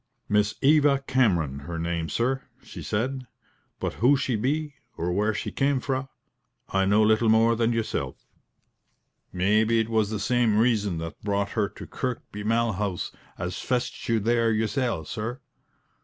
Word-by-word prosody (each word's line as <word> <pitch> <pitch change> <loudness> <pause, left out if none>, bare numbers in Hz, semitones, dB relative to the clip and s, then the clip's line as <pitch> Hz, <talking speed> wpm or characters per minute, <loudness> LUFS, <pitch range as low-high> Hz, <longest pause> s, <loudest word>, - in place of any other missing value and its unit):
"Miss 105 0 +2
Eva 145 -1 +4
Cameron 90 - +2
be - - -12
her 85 +1 -5
name, 85 -1 -2
sir," 130 - 0 0.2
she - - -9
said: 130 +4 -2 0.5
"but - - -2
who 135 +4 +5
she 130 -2 -1
be, 145 +7 -1 0.2
or 85 +2 -1
where 105 +4 +1
she 105 - -4
came 140 0 +1
fra, 135 0 -2 0.6
I 95 0 +2
know 105 +3 +4
little 110 +1 +3
more 115 +1 +5
than 115 0 +1
yoursel'. 115 -1 -2 1.1
Maybe 110 +5 +2
it 110 0 0
was 110 -2 +2
the 110 -1 -3
same 115 0 +2
reason 105 -6 +2
that 80 0 -6
brought 100 -1 -1
her 105 -2 0
to - - -10
Kirkby 120 -5 -5
Malhouse 105 -4 0 0.3
as 90 0 -4
fetched 125 -2 -2
you 115 -1 +3
there 115 +1 +2
yoursel', 110 - 0
sir." 115 - -4
110 Hz, 155 wpm, -26 LUFS, 100-125 Hz, 1.1 s, who